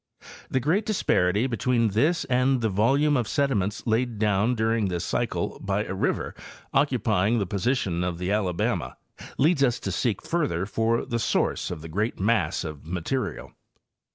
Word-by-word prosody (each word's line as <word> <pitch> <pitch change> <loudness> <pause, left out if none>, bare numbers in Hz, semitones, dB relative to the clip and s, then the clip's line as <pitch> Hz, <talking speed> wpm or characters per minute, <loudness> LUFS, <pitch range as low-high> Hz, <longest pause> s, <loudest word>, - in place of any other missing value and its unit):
The 130 - +1
great 170 - +1
dis 215 -3 -1
parity 90 +6 +2
between 115 -1 +1
this 145 - +2
and 130 0 +2
the 110 - +1
volume 135 +9 +3
of 120 -5 0
sediments 115 -9 0
laid 115 0 0
down 105 +3 +2
during. 110 -1 +1
this 90 -1 -2
cycle - - -2
by - - 0
a - - -4
river - - -1 0.4
occupying 100 +6 +2
the 100 - 0
position 100 -3 -1
of 90 -1 -2
the 90 +2 -2
Ala 100 -4 0
bama 65 -6 -1 0.4
leads 150 +1 +3
us 125 -3 +2
to - - -3
seek 115 -6 -1
farther 145 - -1
for 115 +3 0
the 115 - -2
source - - 0
of 85 -4 -6
the - - -6
great 105 +8 -2
mass 95 -4 +1
of 75 -3 -7
material. 90 +10 -3
110 Hz, 170 wpm, -26 LUFS, 95-125 Hz, 0.4 s, volume